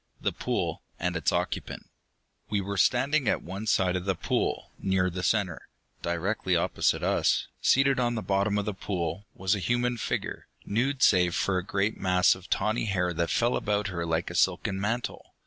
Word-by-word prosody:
The - - 0
pool - - -2 0.2
and 90 0 -1
its 85 - +1
occupant. - - -3 0.6
We 105 - +1
were 100 +1 -3
standing 130 +5 +3
at - - +1
one 95 +5 -6
side 90 -3 +2
of 90 0 -3
the 95 -1 +1
pool, - - -1
near 95 -1 +1
the 90 +2 -4
center. 95 -2 0 0.3
Directly 90 +2 0
opposite 85 - +1
us, - - +2 0.2
seated 135 0 +4
on 120 -1 +1
the 110 - -3
bottom 100 +1 +1
of 105 - -1
the 105 - -2
pool, 95 0 -3
was 95 +1 +1
a 105 - 0
human 120 +5 0
figure, - - -3 0.2
nude 130 +5 0
save 90 -3 +4
for 95 -2 +1
a - - -5
great 100 +3 -1
mass 90 -1 +4
of 95 0 -12
tawny 110 +4 0
hair 90 -4 0
that 85 0 -1
fell 120 +1 +2
about 105 0 0
her 85 -2 -3
like 80 +1 -1
a - - -7
silken 95 +2 +1
mantle. 115 +4 -3
95 Hz, 185 wpm, -28 LUFS, 90-110 Hz, 0.6 s, seated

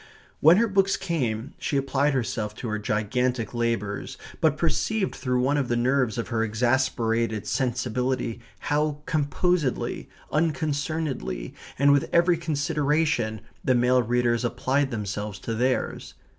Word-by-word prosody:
When 165 +4 +7
her 230 +2 +3
books 195 -1 +2
came 125 -6 -2
she 140 - -1
applied 135 +1 +1
herself 110 -4 -2
to 120 - -6
her 110 0 -2
gigantic 115 +3 -1
labours, 115 -4 -2 0.2
but 155 -2 +2
perceived 190 +6 0
through 125 -2 -1
one 140 +3 +2
of 140 -3 0
the 120 - 0
nerves 125 -1 +1
of 115 - -3
her 115 -2 0
exasperated 115 -2 0
sensibility 125 +1 -1 0.2
how 150 0 0
composedly, 155 0 0 0.2
unconcernedly, 145 - -1 0.2
and 140 +2 +5
with 140 -1 +2
every 170 0 +4
consideration 150 - 0 0.2
the 130 - +3
male 125 +1 +4
readers 120 0 +1
applied 130 +3 0
themselves 105 -3 -4
to 115 - -3
theirs. 125 +3 -1
130 Hz, 130 wpm, -25 LUFS, 115-150 Hz, 0.2 s, When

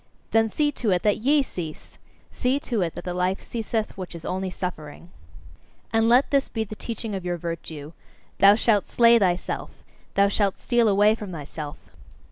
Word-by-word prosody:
Then 225 0 +3
see 295 +6 +1
to 230 - +1
it 180 -2 +2
that 210 -1 +2
YE 280 +5 +3
cease! 165 -10 -8 0.3
See 260 +2 0
to 235 -7 -2
it 170 -2 -2
that - - -7
the 180 - -4
life 180 +2 0
ceaseth 225 -1 -3
which 185 -2 -7
is 165 - -9
only 190 0 -2
suffering! 170 -2 -7 0.8
And 225 0 +3
let 250 +3 +4
this 280 -1 +2
be 225 - -2
the 215 - -8
teaching 225 -1 -5
of 190 -2 -4
your 175 -1 -2
virtue: 160 -2 -6 0.5
"Thou 200 +1 +8
shalt 215 -2 +2
slay 235 0 +5
thyself! 180 -3 -1 0.5
Thou 200 0 +5
shalt 200 -1 0
steal 240 -1 +2
away 205 +1 +5
from 210 -4 -6
thyself!" 150 -2 -7
200 Hz, 180 wpm, -24 LUFS, 175-225 Hz, 0.8 s, Thou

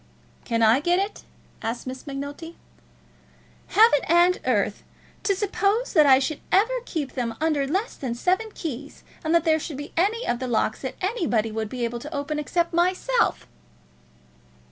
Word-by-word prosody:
"Can 230 -1 +1
I 225 +4 +5
get 345 +4 +2
it?" 400 +2 -3 0.4
asked 230 +1 -4
Miss 260 +2 -7
Macnulty. 285 +4 -6 1.1
"Heaven 435 -8 +5
and 345 +3 +4
earth! - - +1 0.4
To 395 - +1
suppose 410 +4 0
that 305 -6 +6
I 265 -1 +8
should 280 +3 -2
ever 430 +6 +4
keep 300 - -3
them 235 -3 -3
under 300 -3 +1
less 385 - -1
than 245 -4 -3
seven 375 - 0
keys, 285 -3 -6 0.2
and 320 +1 +1
that 335 - +4
there 320 -1 +3
should 300 -2 -6
be 290 +1 -8
any 425 +8 +1
of 240 - 0
the 255 - -3
locks 225 -2 0
that 260 -1 -5
anybody 320 - 0
should 220 -1 -3
be 250 0 -4
able 235 0 -4
to 300 +6 -7
open 295 +2 -2
except 340 +4 -1
myself!" 370 +8 +1
310 Hz, 165 wpm, -24 LUFS, 260-365 Hz, 1.1 s, I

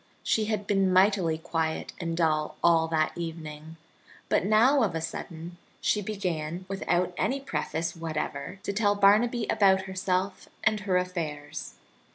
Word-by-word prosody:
She 220 - +1
had 210 -2 -2
been 195 -2 +2
mightily 185 -3 +3
quiet 160 -1 -2
and 165 -2 -3
dull 155 -2 +1
all 165 -1 +5
that 155 -1 0
evening, 160 -2 -7 0.5
but - - +2
now 230 +8 +4
of 195 -8 +1
a - - 0
sudden 165 +1 -6 0.2
she 210 - +1
began, 180 -4 -3
without 180 -2 0
any 275 +2 0
preface 170 - -3
whatever, 160 +1 -4
to 200 - -2
tell 205 0 +2
Barnaby 215 +4 +4
about 190 -2 +4
herself 190 0 -2
and 215 0 +2
her 195 -3 +1
affairs. 155 -5 -4
180 Hz, 145 wpm, -28 LUFS, 160-200 Hz, 0.5 s, all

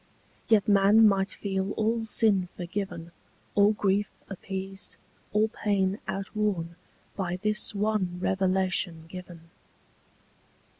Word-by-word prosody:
Yet 215 -3 +4
man 205 +2 +6
might 195 -1 +2
feel 195 0 -2
all 225 +1 0
sin 205 -4 +2
forgiven, 175 -2 -5 0.4
All 205 +1 +5
grief 205 -1 +1 0.2
appeased, 195 0 -5 0.3
all 215 +1 +3
pain 200 -2 0
outworn, 195 -4 -2 0.4
By 180 -3 -2
this 215 0 +2
one 200 -4 0
revelation 185 -3 0
given. 175 -2 -11
195 Hz, 100 wpm, -27 LUFS, 185-210 Hz, 0.4 s, man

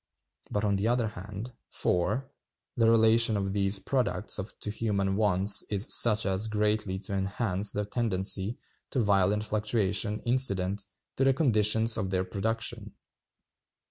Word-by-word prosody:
But, 105 - -2
on 100 -1 +1
the 100 +3 -1
other 120 -2 0
hand, 105 +4 -8 0.2
(4.) 105 +9 -1 0.5
the 115 -3 +3
relation 115 -1 +4
of 95 -1 -3
these 100 0 +2
products 105 -4 0 0.2
to 105 - -4
human 100 -3 -1
wants 100 -1 +3
is 100 0 0
such 110 -2 +4
as 95 +2 +1
greatly 105 -2 -1
to 100 +1 -5
enhance 100 +1 -1
that 105 0 -4
tendency 105 -1 +1 0.3
to 130 - -2
violent 100 -1 +2
fluctuation 105 -1 -1
incident 100 -6 0 0.3
to 135 - +1
the 135 0 +4
conditions 110 -4 +3
of 95 - -3
their 95 -1 0
production. 110 +2 -4
105 Hz, 140 wpm, -28 LUFS, 95-115 Hz, 0.5 s, relation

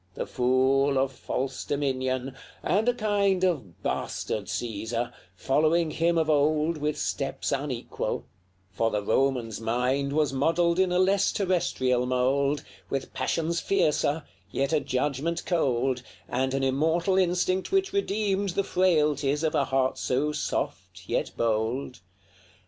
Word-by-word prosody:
The - - -3
fool 130 +2 +2
of 135 0 +1
false 130 +1 -3
dominion 130 -2 -1 0.3
and 215 +6 +2
a - - +3
kind 200 -4 +1
Of 135 - -1
bastard 105 -2 -2
Caesar, 120 +1 -3 0.2
following 155 - +2
him 170 +2 +1
of 160 -1 +2
old 155 +2 +2
With 150 0 -1
steps 135 -1 -2
unequal; 135 -3 -3 0.5
for 115 +3 +1
the 105 -2 -2
Roman's 115 -1 0
mind 125 +5 0
Was 150 -2 +1
modelled 170 +5 +2
in 190 -1 +3
a 180 - +2
less 195 +2 +3
terrestrial 130 -10 +1
mould, 135 +3 +1 0.3
With 135 -1 -3
passions 170 0 -1
fiercer, 160 -5 +1 0.3
yet 140 +3 -1
a 155 - +4
judgment 145 +6 -1
cold, 130 -6 +1 0.3
And 130 +1 -1
an 135 - 0
immortal 160 +8 +2
instinct 185 - +1
which 385 0 +1
redeemed 205 - 0
The 200 - +2
frailties 150 -6 +2
of 155 - +1
a 140 - +2
heart 130 -1 0
so 140 +4 0
soft, - - -4
yet - - 0
bold. 115 +4 -1
140 Hz, 135 wpm, -27 LUFS, 130-170 Hz, 0.5 s, a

